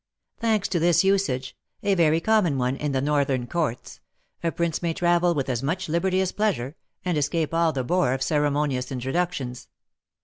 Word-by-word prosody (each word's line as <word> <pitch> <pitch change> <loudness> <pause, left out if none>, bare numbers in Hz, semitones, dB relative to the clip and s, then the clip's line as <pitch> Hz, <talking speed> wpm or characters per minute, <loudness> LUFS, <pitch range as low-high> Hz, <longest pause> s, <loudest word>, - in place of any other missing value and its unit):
Thanks 220 -3 +1
to 180 -3 0
this 170 +1 +4
usage 190 -10 0 0.3
(a 200 - +2
very 165 -3 +3
common 185 -6 +2
one 125 +1 0
in 145 +1 -2
the 135 -1 0
Northern 140 -4 +1
courts), 150 -5 -3 0.4
a 165 - +1
prince 170 -2 -1
may 170 -2 -1
travel 175 0 +2
with 140 -2 -1
as 125 -3 -1
much 170 +7 -2
liberty 185 +4 +1
as 190 - 0
pleasure, 180 - -1 0.3
and 175 -4 +1
escape 155 +2 -1
all 165 -1 +3
the 135 -3 -2
bore 175 0 +1
of 135 - -2
ceremonious 145 -3 0
introductions. 130 -1 -3
160 Hz, 175 wpm, -25 LUFS, 135-175 Hz, 0.4 s, this